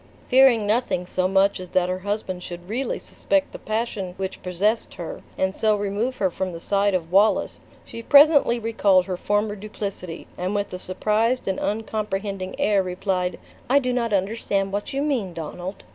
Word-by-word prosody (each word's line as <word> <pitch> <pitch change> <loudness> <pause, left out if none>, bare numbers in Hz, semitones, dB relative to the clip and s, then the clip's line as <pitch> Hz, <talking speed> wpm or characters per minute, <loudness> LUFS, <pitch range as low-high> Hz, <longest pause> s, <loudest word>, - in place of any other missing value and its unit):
Fearing 255 -4 +6
nothing 210 -4 0
so 185 0 0
much 195 +1 +3
as 185 -1 -8
that 180 -1 +2
her 185 0 -2
husband 195 -2 -3
should 175 0 -8
really 245 +7 -2
suspect 290 -1 -1
the - - -9
passion 215 -4 -3
which 190 0 -4
possessed 200 +5 -1
her, 170 - -6 0.2
and 190 +1 0
so 215 -1 +2
remove 205 +5 -2
her 190 -2 +1
from 185 0 -3
the 165 - -6
side 200 +2 +1
of 170 -2 -3
Wallace, 205 +3 +3 0.3
she 230 - -8
presently 285 -1 +6
recalled 205 -5 +3
her 185 -1 -3
former 205 +3 0
duplicity, 195 -4 -6
and 185 +3 -1
with 205 -2 -2
a 180 - -4
surprised 215 +7 0
and 190 - -1
uncomprehending 205 -3 -3
air 205 -2 +3
replied, 180 -1 -2 0.3
"I 275 - +5
do 255 -3 +1
not 235 -2 0
understand 195 0 0
what 205 +1 -3
you 275 +1 -1
mean, 235 - -1
Donald." 175 +4 -6
200 Hz, 175 wpm, -24 LUFS, 185-220 Hz, 0.3 s, Fearing